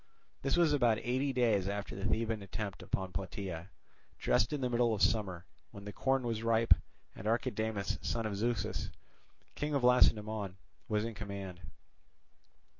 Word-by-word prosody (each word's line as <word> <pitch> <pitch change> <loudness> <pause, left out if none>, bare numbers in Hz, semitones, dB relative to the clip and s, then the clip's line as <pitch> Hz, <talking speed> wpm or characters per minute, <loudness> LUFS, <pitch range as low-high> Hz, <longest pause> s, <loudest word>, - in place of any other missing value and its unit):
This 135 +4 +1
was 165 -3 +4
about 120 -6 +4
eighty 130 +4 0
days 115 -7 +2
after 100 0 -4
the 100 - -4
Theban 110 0 0
attempt 100 +1 -5
upon 95 -1 -3
Plataea, 95 -1 -5 0.5
just 105 - +2
in 150 - -1
the 125 - +1
middle 120 -2 +3
of 100 - 0
summer, 95 -5 +1 0.2
when 100 0 -11
the 105 - -6
corn 135 -1 +1
was 115 -2 -2
ripe, 115 0 +5 0.4
and 100 - -6
Archidamus, 110 -3 -1
son 115 -1 -1
of 105 -2 -2
Zeuxis, 110 -1 -1 0.6
king 150 0 -2
of 135 - +1
Lacedaemon, 110 -5 +3 0.3
was 105 0 +1
in 115 - -4
command. 100 -4 -6
110 Hz, 155 wpm, -33 LUFS, 100-120 Hz, 0.6 s, ripe